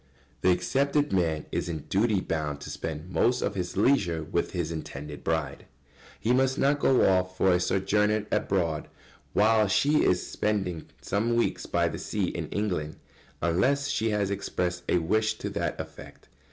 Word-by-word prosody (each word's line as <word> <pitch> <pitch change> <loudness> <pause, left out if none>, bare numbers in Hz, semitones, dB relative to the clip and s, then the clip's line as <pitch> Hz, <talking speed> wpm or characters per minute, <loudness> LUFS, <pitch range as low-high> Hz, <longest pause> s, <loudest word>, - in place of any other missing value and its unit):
] - - -34
The 95 - +3
accepted 140 +8 +1
man 80 -5 +1
is - - -2
in 80 -3 -3
duty 100 +5 +1
bound 75 -4 -2
to - - -7
spend 80 +3 -5
most 125 +6 +2
of 100 - -1
his 90 -2 -4
leisure 95 - +2
with 85 +2 -1
his 85 -3 -2
intended 75 -2 -7
bride. 80 -2 -2 0.5
He 120 - +1
must 130 +1 +2
not 145 +1 +2
go 130 -2 +4
off 95 -1 +1
for 95 - +4
a 90 - +3
sojourn 105 +3 +1
abroad 85 -6 0 0.5
while 110 0 +4
she 145 +10 +3
is 90 - +2
spending 95 -6 -2 0.2
some 115 +4 0
weeks 120 - 0
by - - +1
the - - -5
sea - - -1
in - - -5
England, 90 -8 -2 0.5
unless 125 +12 +2
she 110 +1 0
has 105 -2 0
expressed 90 -3 -2
a - - +4
wish 110 +6 +1
to - - -5
that - - -2
effect. - - -10
95 Hz, 170 wpm, -27 LUFS, 85-110 Hz, 0.5 s, go